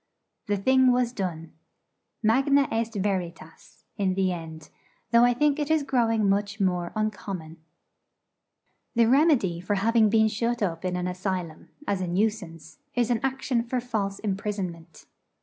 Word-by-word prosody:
The 205 Hz, -1 st, +1 dB
thing 260 Hz, +5 st, +4 dB
was 245 Hz, -1 st, +1 dB
done. 170 Hz, -7 st, -5 dB, 0.7 s
Magna 275 Hz, +5 st, +3 dB
est 225 Hz, 0 st, -2 dB
veritas, 175 Hz, -5 st, -5 dB
in 190 Hz, -2 st, 0 dB
the 190 Hz, -1 st, +1 dB
end: 160 Hz, -3 st, -8 dB, 0.4 s
though 235 Hz, 0 st, +6 dB
I 245 Hz, 0 st, +4 dB
think 295 Hz, +2 st, +2 dB
it 295 Hz, 0 st, -2 dB
is 315 Hz, -2 st, +2 dB
growing 225 Hz, -6 st, +1 dB
much 200 Hz, +1 st, 0 dB
more 180 Hz, -3 st, 0 dB
uncommon. 190 Hz, -6 st, -4 dB, 1.4 s
The 235 Hz, 0 st, +5 dB
remedy 250 Hz, -, +3 dB
for 205 Hz, +3 st, -1 dB
having 220 Hz, +2 st, +3 dB
been 220 Hz, 0 st, +4 dB
shut 230 Hz, +1 st, -1 dB
up 165 Hz, -3 st, -2 dB
in 180 Hz, 0 st, -1 dB
an 180 Hz, 0 st, -2 dB
asylum, 180 Hz, -3 st, -4 dB, 0.2 s
as 200 Hz, -2 st, -1 dB
a 180 Hz, -, -2 dB
nuisance, 175 Hz, -5 st, -2 dB, 0.2 s
is 245 Hz, -1 st, +1 dB
an 235 Hz, -, +2 dB
action 265 Hz, -2 st, -1 dB
for 245 Hz, +2 st, -2 dB
false 215 Hz, -5 st, -3 dB
imprisonment. 190 Hz, -5 st, -5 dB
205 Hz, 150 wpm, -26 LUFS, 180-235 Hz, 1.4 s, though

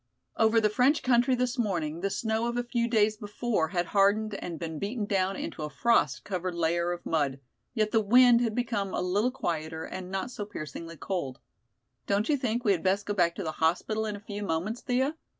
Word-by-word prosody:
Over 225 Hz, +1 st, +4 dB
the 215 Hz, -, +3 dB
French 265 Hz, +7 st, +3 dB
country 250 Hz, +1 st, +3 dB
this 250 Hz, 0 st, -1 dB
morning 170 Hz, -8 st, -1 dB
the 195 Hz, -, 0 dB
snow 220 Hz, +3 st, -1 dB
of 240 Hz, 0 st, -2 dB
a 245 Hz, -, 0 dB
few 240 Hz, -1 st, -1 dB
days 215 Hz, -2 st, +2 dB
before 210 Hz, -4 st, -1 dB
had 175 Hz, +2 st, -1 dB
hardened 205 Hz, +2 st, +3 dB
and 175 Hz, -4 st, -5 dB
been 160 Hz, -1 st, -5 dB
beaten 210 Hz, +2 st, -2 dB
down 195 Hz, -1 st, 0 dB
into 160 Hz, -, -5 dB
a 150 Hz, -, -3 dB
frost 230 Hz, +12 st, +2 dB
covered 185 Hz, -2 st, -3 dB
layer 170 Hz, +1 st, +1 dB
of 175 Hz, 0 st, -6 dB
mud, 140 Hz, -4 st, 0 dB, 0.4 s
yet 215 Hz, -2 st, +1 dB
the 225 Hz, -, +3 dB
wind 240 Hz, +3 st, +6 dB
had 225 Hz, -3 st, 0 dB
become 220 Hz, -6 st, -1 dB
a -, -, -1 dB
little 200 Hz, +7 st, +1 dB
quieter 160 Hz, -9 st, -3 dB
and 185 Hz, -1 st, -7 dB
not 195 Hz, +6 st, -3 dB
so 215 Hz, -, -5 dB
piercingly 165 Hz, -3 st, -7 dB
cold. 145 Hz, -7 st, -3 dB, 0.7 s
"Don't 205 Hz, +5 st, +1 dB
you 300 Hz, -, +4 dB
think 245 Hz, -2 st, -2 dB
we 205 Hz, -, +5 dB
had 180 Hz, -4 st, +1 dB
best 195 Hz, +2 st, +1 dB
go 205 Hz, -, -1 dB
back 175 Hz, -4 st, +2 dB
to 195 Hz, -, -4 dB
the 160 Hz, -, -2 dB
hospital 180 Hz, +8 st, 0 dB
in 210 Hz, -, -3 dB
a -, -, -8 dB
few 205 Hz, 0 st, -7 dB
moments, 195 Hz, +5 st, -2 dB
Thea?" 260 Hz, +4 st, 0 dB
205 Hz, 215 wpm, -28 LUFS, 175-235 Hz, 0.7 s, wind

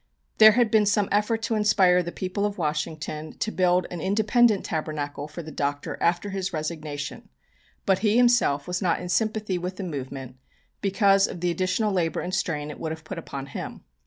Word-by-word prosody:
There 215 Hz, 0 st, +9 dB
had 235 Hz, -1 st, +2 dB
been 215 Hz, -2 st, +4 dB
some 205 Hz, 0 st, +2 dB
effort 215 Hz, +2 st, +1 dB
to 230 Hz, -, -1 dB
inspire 200 Hz, -4 st, +4 dB
the 170 Hz, -1 st, -5 dB
people 190 Hz, +3 st, -3 dB
of 205 Hz, 0 st, -1 dB
Washington 155 Hz, -1 st, -3 dB
to 220 Hz, -, -2 dB
build 180 Hz, -1 st, +2 dB
an 175 Hz, -2 st, -5 dB
independent 215 Hz, +2 st, +3 dB
Tabernacle 150 Hz, -2 st, -3 dB
for 170 Hz, +3 st, -8 dB
the 155 Hz, -, -9 dB
Doctor 145 Hz, 0 st, -2 dB
after 175 Hz, +4 st, +1 dB
his 190 Hz, -1 st, -3 dB
resignation, 155 Hz, -3 st, -5 dB, 0.6 s
but 190 Hz, -1 st, +3 dB
he 210 Hz, +2 st, +2 dB
himself 240 Hz, -13 st, +3 dB
was 180 Hz, +2 st, -2 dB
not 175 Hz, -4 st, +1 dB
in 180 Hz, -, -6 dB
sympathy 210 Hz, 0 st, 0 dB
with 180 Hz, +2 st, -4 dB
the 200 Hz, -, -4 dB
movement 135 Hz, -5 st, -6 dB, 0.4 s
because 195 Hz, 0 st, +4 dB
of 175 Hz, -, -7 dB
the 175 Hz, 0 st, 0 dB
additional 185 Hz, +5 st, 0 dB
labour 165 Hz, -4 st, 0 dB
and 180 Hz, -, -5 dB
strain 150 Hz, -6 st, -1 dB
it -, -, -10 dB
would 160 Hz, -, -3 dB
have 160 Hz, -1 st, -7 dB
put 170 Hz, +2 st, -6 dB
upon 140 Hz, -4 st, -6 dB
him. 140 Hz, -, -7 dB
180 Hz, 190 wpm, -25 LUFS, 155-205 Hz, 0.6 s, There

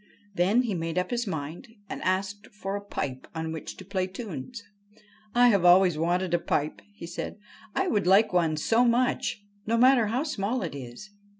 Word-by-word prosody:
Then 195 Hz, +7 st, +3 dB
he 230 Hz, -4 st, -2 dB
made 165 Hz, -1 st, -3 dB
up 180 Hz, 0 st, 0 dB
his 240 Hz, -1 st, -1 dB
mind 170 Hz, -, -6 dB
and -, -, -6 dB
asked 195 Hz, +2 st, -1 dB
for 200 Hz, -1 st, -5 dB
a 205 Hz, -, -4 dB
pipe 135 Hz, -10 st, -5 dB
on 160 Hz, 0 st, -3 dB
which 160 Hz, -1 st, -7 dB
to 190 Hz, -, -10 dB
play 185 Hz, -1 st, -1 dB
tunes. 205 Hz, -, -7 dB, 0.4 s
' 215 Hz, -, -28 dB, 0.3 s
I 245 Hz, 0 st, +6 dB
have 200 Hz, -5 st, +3 dB
always 180 Hz, -1 st, +6 dB
wanted 175 Hz, +3 st, 0 dB
a 175 Hz, -, +3 dB
pipe,' 150 Hz, -2 st, -1 dB
he 170 Hz, -, -8 dB
said; 170 Hz, +3 st, -6 dB, 0.2 s
' -, -, -21 dB
I 385 Hz, -, +1 dB
would 205 Hz, -, +1 dB
like 195 Hz, +2 st, +5 dB
one 165 Hz, -3 st, +2 dB
so 225 Hz, +9 st, +3 dB
much, 240 Hz, -3 st, +1 dB, 0.2 s
no 230 Hz, +1 st, +2 dB
matter 250 Hz, -2 st, +5 dB
how 245 Hz, +6 st, 0 dB
small 245 Hz, -4 st, -2 dB
it -, -, -4 dB
is.' 135 Hz, +9 st, -9 dB
195 Hz, 200 wpm, -27 LUFS, 170-230 Hz, 0.4 s, I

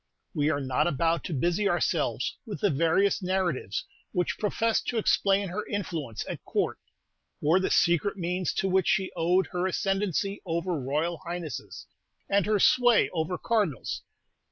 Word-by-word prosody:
We 150 Hz, -3 st, +1 dB
are 145 Hz, -, 0 dB
not 130 Hz, +1 st, +1 dB
about 165 Hz, +2 st, +1 dB
to 175 Hz, -, -3 dB
busy 175 Hz, +7 st, +1 dB
ourselves -, -, 0 dB
with 220 Hz, -6 st, -7 dB
the 205 Hz, -, +3 dB
various 170 Hz, +8 st, +2 dB
narratives 180 Hz, -, -1 dB, 0.3 s
which 180 Hz, -1 st, -1 dB
professed 220 Hz, +2 st, 0 dB
to 240 Hz, -, -1 dB
explain 200 Hz, -2 st, +2 dB
her 205 Hz, +4 st, -3 dB
influence 160 Hz, -, -4 dB
at -, -, -6 dB
Court, -, -, -1 dB, 0.6 s
or 160 Hz, +5 st, +3 dB
the 190 Hz, -, 0 dB
secret 175 Hz, +4 st, +2 dB
means 180 Hz, 0 st, -1 dB
to 195 Hz, -, 0 dB
which 190 Hz, -1 st, +2 dB
she 190 Hz, -1 st, +1 dB
owed 180 Hz, +3 st, +2 dB
her 180 Hz, 0 st, 0 dB
ascendency 195 Hz, +1 st, -1 dB
over 170 Hz, 0 st, -2 dB
royal 155 Hz, +4 st, -1 dB
highnesses, 170 Hz, -4 st, -6 dB, 0.4 s
and 200 Hz, 0 st, +2 dB
her 215 Hz, -1 st, +3 dB
sway 245 Hz, +3 st, +4 dB
over 165 Hz, +1 st, -1 dB
cardinals. 205 Hz, -, -1 dB
180 Hz, 155 wpm, -28 LUFS, 165-200 Hz, 0.6 s, sway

